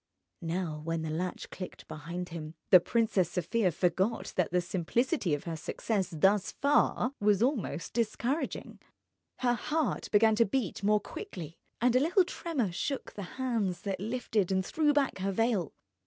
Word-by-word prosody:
Now 165 -2 -2
when 165 0 -2
the 160 - -3
latch 180 +3 -3
clicked 185 - -8
behind 170 +4 -6
him, 160 -1 -7 0.2
the 185 - +10
Princess 205 -3 +1
Sofia 185 +3 +1
forgot 185 +7 0
that 180 - +1
the 180 - +2
simplicity 185 - 0
of 145 - -7
her 165 -2 -4
success 190 +5 -2
thus 195 +5 +2
far 280 -2 +2
was 205 0 +3
almost 245 - -1
discouraging. 240 +6 -2 0.6
Her 245 -1 +3
heart 300 +4 -1
began 220 +1 +5
to 230 - +6
beat 205 -3 -2
more 210 +1 +3
quickly, 165 -5 -8 0.2
and 245 +1 +3
a - - +6
little 350 +6 +4
tremor 290 - -2
shook 270 +10 -3
the 205 - -6 0.2
hands 225 -9 -1
that 195 -2 -2
lifted 215 -3 -1
and 190 -1 +1
threw 305 - +2
back 285 -7 +1
her 195 +1 0
veil. 220 -3 +1
200 Hz, 160 wpm, -30 LUFS, 175-240 Hz, 0.6 s, the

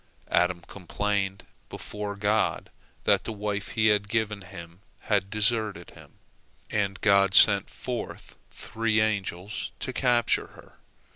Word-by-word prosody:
Adam 90 0 +2
complained 100 +1 -3 0.2
before 105 -1 -6
God 105 +2 0 0.3
that - - +3
the - - -4
wife 105 -1 -3
He 110 - 0
had 105 -1 +1
given 110 -2 -1
him 85 0 -11 0.2
had 100 -2 0
deserted 105 -4 0
him, - - -16 0.6
and 100 -3 -1
God 100 -2 +4
sent 100 -3 +7
forth 125 -2 -6
three 110 -1 -1
angels 100 -2 -2
to 130 - -4
capture 120 -3 +2
her. - - -18
105 Hz, 125 wpm, -26 LUFS, 100-110 Hz, 0.6 s, sent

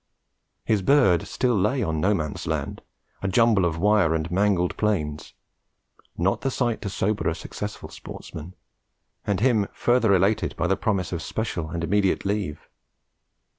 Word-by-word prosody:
His 105 -3 +2
bird 95 - +3
still 125 -2 0
lay 105 +7 +1
on 80 -1 -1
No 100 +4 +3
Man's 75 -5 -4
Land, - - -3 0.4
a 100 - -1
jumble 105 -1 +3
of 85 -1 -1
wire 100 -3 +3
and 80 +1 -3
mangled 95 -2 +1
planes; 80 -9 -2 0.8
not 90 +3 +1
the 135 - 0
sight 120 -3 -1
to 100 - -3
sober 105 +2 0
a - - -2
successful - - -7
sportsman, 80 +4 -9 0.7
and 100 -1 0
him 110 -5 +3
further 120 -3 +2
elated 100 +4 +1
by - - 0
the 95 +2 +2
promise 100 -6 -1
of 85 -3 -3
special 85 -5 -3
and 85 +1 -4
immediate 100 +2 +1
leave. 100 -7 -3
100 Hz, 155 wpm, -24 LUFS, 85-110 Hz, 0.8 s, bird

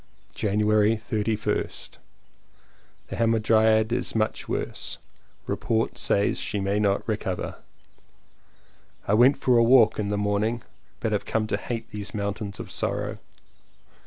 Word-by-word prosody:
January 105 +1 +2
31st. 105 -1 -2 1.1
The 100 - -5
Hamadryad 110 -1 +3 0.2
much 110 -1 -1
worse. - - -3 0.5
Report 115 0 -1
says 100 - +1
she 105 - -2
may 100 +1 0
not 100 -1 +1
recover. 100 -4 -3 1.5
I 100 - +2
went 125 +6 +4
a 130 - +3
walk 115 -2 +5
in 100 -1 -1
the 105 - 0
morning, 105 +3 0 0.4
but - - -1
have - - -1
come 110 -1 0
to 110 - -1
hate 115 +1 -5
these 105 0 -6
mountains 100 0 -3
of - - -7
sorrow. - - -2
105 Hz, 120 wpm, -25 LUFS, 105-115 Hz, 1.5 s, walk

